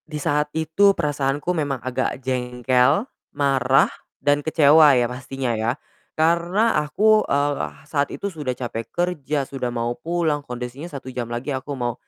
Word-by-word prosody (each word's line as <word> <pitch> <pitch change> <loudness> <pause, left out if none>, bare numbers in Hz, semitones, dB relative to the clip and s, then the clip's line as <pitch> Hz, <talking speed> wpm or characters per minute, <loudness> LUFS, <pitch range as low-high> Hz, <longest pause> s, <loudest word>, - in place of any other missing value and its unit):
Di 150 - -4
saat 150 0 0
itu 175 +6 +3
perasaanku 145 +1 -1
memang 145 -5 -1
agak 130 -1 -2
jengkel, 125 - +1 0.3
marah, 135 -2 +3 0.3
dan 145 +1 +2
kecewa 150 -2 +6
ya 120 - +3
pastinya 125 0 -4
ya. 110 +1 0 0.5
Karena 170 +7 +2
aku, 215 +8 +3
eee, 145 0 0 0.2
saat 145 -2 0
itu 200 - -4
sudah 150 -8 -4
capek 115 -2 -5
kerja, 155 -5 -1
sudah 130 -3 -3
mau 120 0 -1
pulang, 165 0 -1
kondisinya 125 +6 -6
1 135 -4 -8
jam 120 -2 -4
lagi 120 +5 -3
aku 130 +2 -6
mau 120 -1 -1
140 Hz, 150 wpm, -22 LUFS, 125-160 Hz, 0.5 s, kecewa